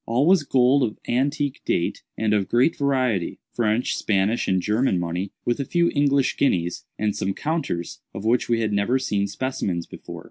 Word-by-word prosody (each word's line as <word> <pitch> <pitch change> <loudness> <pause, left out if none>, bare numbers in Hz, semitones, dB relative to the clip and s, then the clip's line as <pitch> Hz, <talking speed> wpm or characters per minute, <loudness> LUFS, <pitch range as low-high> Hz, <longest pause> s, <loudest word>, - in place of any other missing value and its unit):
All 120 +5 +2
was 185 0 +5
gold 135 0 +3
of 110 -4 -1
antique 140 +3 0
date 85 - -1 0.2
and 110 -1 +1
of 100 -2 +1
great 125 +7 +3
variety—French, 120 -3 0
Spanish, 105 +3 +1
and 95 -1 +2
German 105 0 +1
money, 90 +3 -3
with 120 +3 0
a - - 0
few 170 +4 +1
English 140 -2 +2
guineas, 90 -10 0
and 105 -1 0
some 95 0 -2
counters, 150 - -3
of 100 - -7
which 120 +2 +2
we 115 -1 +2
had 110 -2 0
never 100 +6 +2
seen 105 -7 -1
specimens 100 -7 -3
before. - - -9
120 Hz, 175 wpm, -23 LUFS, 100-135 Hz, 0.2 s, was